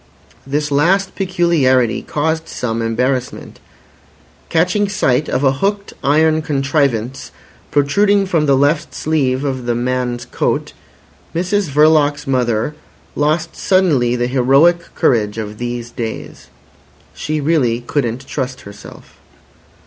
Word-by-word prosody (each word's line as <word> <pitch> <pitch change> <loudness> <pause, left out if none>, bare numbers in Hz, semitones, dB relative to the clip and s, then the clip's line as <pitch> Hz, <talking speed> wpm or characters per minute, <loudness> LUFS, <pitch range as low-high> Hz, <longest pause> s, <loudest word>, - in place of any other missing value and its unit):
This 145 +1 -1
last 185 +7 +2
peculiarity 165 - +1
caused 160 +2 -2
some 115 -1 -3
embarrassment. 125 +3 -2 0.9
Catching 180 +5 +1
sight 145 -7 +1
of 130 - -1
a 135 - +4
hooked 200 +8 -2
iron 155 +2 +3
contrivance 135 -4 -1 0.4
protruding 200 +8 +2
from 165 -5 0
the 135 -1 +4
left 145 +4 +1
sleeve 140 -4 0
of 130 -3 -3
the 120 - +1
man's 125 0 -2
coat, - - -2 0.6
Mrs 185 +1 0
Verloc's 150 0 +3
mother 125 -1 0 0.4
lost 155 +3 0
suddenly 150 -11 +2
the 120 0 0
heroic 135 +7 +4 0.2
courage 105 -3 +1
of 105 -1 -6
these 120 -1 -4
days. 115 - -6 0.7
She 155 0 -3
really 140 -6 +1
couldn't 120 -1 -2
trust 130 -2 -4
herself. 100 0 -13
140 Hz, 115 wpm, -17 LUFS, 125-160 Hz, 0.9 s, a